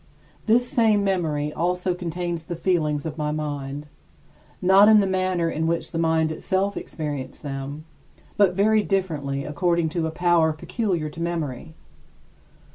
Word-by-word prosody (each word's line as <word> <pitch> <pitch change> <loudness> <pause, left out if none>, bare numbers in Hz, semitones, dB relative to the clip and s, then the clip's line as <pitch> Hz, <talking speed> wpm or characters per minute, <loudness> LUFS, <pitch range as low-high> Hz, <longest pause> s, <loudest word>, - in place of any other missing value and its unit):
This 240 +3 +4
same 220 -4 +3
memory 155 -6 -1
also 180 +2 0
contains 175 -1 -4
the 175 - -4
feelings 160 -4 0
of 155 0 -5
my 150 0 -1
mind; 145 -1 -4 0.7
not 195 +3 +6
in 215 -1 +7
the 200 - +3
manner 185 -2 0
in 160 0 -1
which 170 0 -1
the 165 - -2
mind 160 -1 +2
itself 190 +5 -1
experienced 145 -5 -5
them, 140 +2 -5 0.5
but 195 -3 +3
very 215 +2 +4
differently 150 -9 -2
according 170 +2 0
to 165 0 -1
a - - -2
power 170 -1 +3
peculiar 175 - -2
to 165 - -8
memory. 160 -3 -4
165 Hz, 145 wpm, -24 LUFS, 150-185 Hz, 0.7 s, in